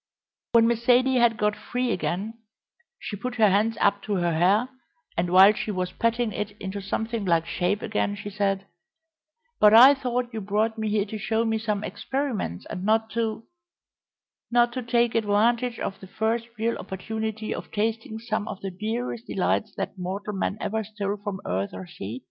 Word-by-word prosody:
When 230 -1 +6
Miss 235 0 0
Zaidie 255 +1 +4
had 235 -2 +4
got 210 0 +1
free 245 +3 -2
again 195 +4 -2 0.6
she - - -6
put 245 +5 -5
her 215 -4 +5
hands 215 +3 +2
up 200 0 +3
to 210 - -1
her 175 -2 +1
hair, 195 +9 +3 0.5
and 175 +1 0
while 190 +3 +8
she 220 - -4
was 185 -3 -2
patting 230 +2 0
it 210 0 -5
into 195 +1 -5
something 220 +3 -2
like 170 -3 +2
shape 180 +4 -1
again 210 -1 -1
she 205 0 -7
said: 195 -1 0 0.9
"But 210 +1 +7
I 260 +5 +10
thought 250 -2 -2
you 220 - -3
brought 210 +3 0
me 220 -1 -2
here 205 -1 +1
to 215 +1 -6
show 225 +2 0
me 225 -1 0
some 210 -2 -2
experiments, 215 - -3
and 180 - -5
not 220 +2 +2
to 225 -1 -2 0.6
" - - -61
"Not 240 0 +4
to 255 - -3
take 235 -1 +2
advantage 230 +3 +2
of 195 - -4
the 190 - -11
first 225 +4 -1
real 230 +2 -1
opportunity 220 +3 -4
of - - -7
tasting 220 +1 -2
some 220 -2 -3
of 195 - -6
the 195 - -4
dearest 225 +5 -4
delights 200 +2 0
that 195 - -4
mortal 195 +3 -4
man 195 +1 -2
ever 220 +1 -2
stole 205 -1 -3
from 200 -2 -5
earth 95 +2 -2
or 185 - -7
sea? 120 - -7
215 Hz, 185 wpm, -25 LUFS, 195-230 Hz, 0.9 s, I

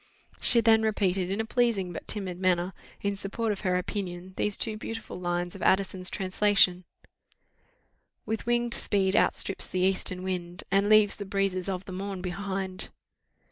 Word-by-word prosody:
She 235 - +8
then 220 0 +5
repeated, 195 -4 0
in 200 - -2
a 225 - 0
pleasing 220 -7 0
but - - -8
timid 190 -4 -3
manner, 185 0 +1 0.3
in 200 0 -1
support 210 +3 -2
of 200 - -3
her 180 -2 0
opinion, 180 -1 -5
these 210 0 -1
two 220 -2 -2
beautiful 225 -2 -7
lines 175 0 -2
of 195 - -10
Addison's 185 -1 +2
translation: 190 -1 +2 1.4
"With 220 +1 -4
winged 240 0 +1
speed 195 -2 +1
outstrips 195 - +2
the 185 - -1
eastern 185 -1 +1
wind, 180 -1 -4
And 200 +2 +3
leaves 215 -1 +5
the 205 - -6
breezes 195 -1 -1
of 185 0 -4
the - - -8
morn 190 0 -5
behind." 190 0 -4
195 Hz, 160 wpm, -28 LUFS, 185-210 Hz, 1.4 s, She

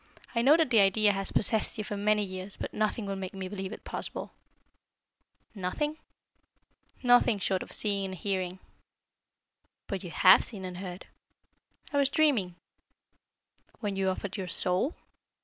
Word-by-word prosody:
I 235 - +1
know 285 +6 +6
that 320 -6 +1
the 225 - +6
idea 205 +2 +4
has 195 -1 +1
possessed 220 +1 +3
you 215 - -2
for 205 - -5
many 210 +1 +2
years, 185 0 -7
but - - -6
nothing 215 +1 -1
will 195 0 -3
make 190 0 -6
me 190 -1 -5
believe 190 0 -5
it - - -9
possible." - - -6 1.2
"Nothing?" 230 +11 -3 1.1
"Nothing 245 -3 +5
short 190 -1 -1
of - - -8
seeing 200 -2 +1
and 190 -1 -5
hearing." 185 -1 -2 1.3
"But 195 -2 -5
you 180 - -6
have 185 +3 +6
seen 195 -5 -5
and 180 -1 -6
heard." 180 -1 -7 0.9
"I - - +1
was 280 -1 +3
dreaming." 260 - +2 1.2
"When 205 -3 -3
you 190 0 +1
offered 190 +2 -4
your 190 -2 -4
soul?" 185 - 0
200 Hz, 155 wpm, -29 LUFS, 185-220 Hz, 1.3 s, know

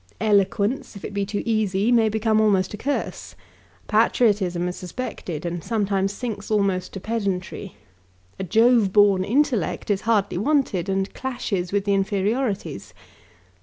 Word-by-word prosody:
Eloquence, 205 +3 +1
if 200 - -8
it - - -6
be 200 -1 -1
too 205 0 -3
easy, 215 -1 +1
may 225 -2 +4
become 220 0 +2
almost 195 -3 +2
a - - -5
curse. 280 +6 -3 0.5
Patriotism 190 -7 +2
is 180 - -4
suspected, 180 - -6
and 170 -1 -4
sometimes 200 -3 0
sinks 210 -2 -5
almost 195 -4 0
to 195 - -5
pedantry. 195 -2 -3 0.6
A - - -2
Jove 225 +1 +4
born 200 -2 +4
intellect 240 - 0
is 200 -1 0
hardly 215 -5 +1
wanted, 225 - +1
and 195 0 -1
clashes 215 -9 -3
with 200 0 0
the 200 - +2
inferiorities. 200 - -1
205 Hz, 140 wpm, -23 LUFS, 190-225 Hz, 0.6 s, may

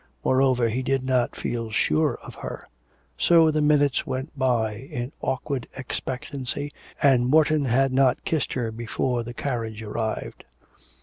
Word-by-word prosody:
Moreover, 130 -2 +3
he 120 +3 -1
did 135 0 0
not 130 -2 +1
feel 115 -1 -3
sure 80 -7 +2
of - - -9
her. - - -7 0.5
So 165 -2 +5
the 155 0 +1
minutes 145 -2 +3
went 130 +4 -3
by 120 -5 +1
in 120 +2 -6
awkward 130 -1 -2
expectancy, 140 +1 -4 0.3
and 130 -4 +5
Morton 155 +1 +4
had 130 +2 +2
not 130 -1 +3
kissed 160 -4 0
her 120 -3 -2
before 120 +2 -2
the 120 +1 -7
carriage 115 -5 -3
arrived. 110 +1 -4
130 Hz, 140 wpm, -25 LUFS, 120-140 Hz, 0.5 s, So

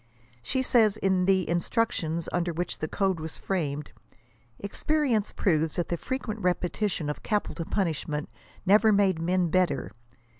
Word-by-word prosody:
She 260 - -1
says, 220 -5 +4
in 190 -3 +2
the 190 -1 +3
"Instructions" 170 -2 0
under 175 0 0
which 175 +1 -3
the 155 - -2
code 190 0 0
was 160 0 -5
framed, 150 -6 -2 0.7
"experience 235 +1 0
proves 160 -4 +1
that 175 - -1
the 175 - 0
frequent 225 0 -4
repetition 180 -2 -1
of 150 - -4
capital 205 -5 -2
punishment 155 -5 -2 0.4
never 210 +3 +6
made 195 -4 +3
men 175 +1 +1
better. 180 -6 +1
185 Hz, 140 wpm, -27 LUFS, 165-210 Hz, 0.7 s, never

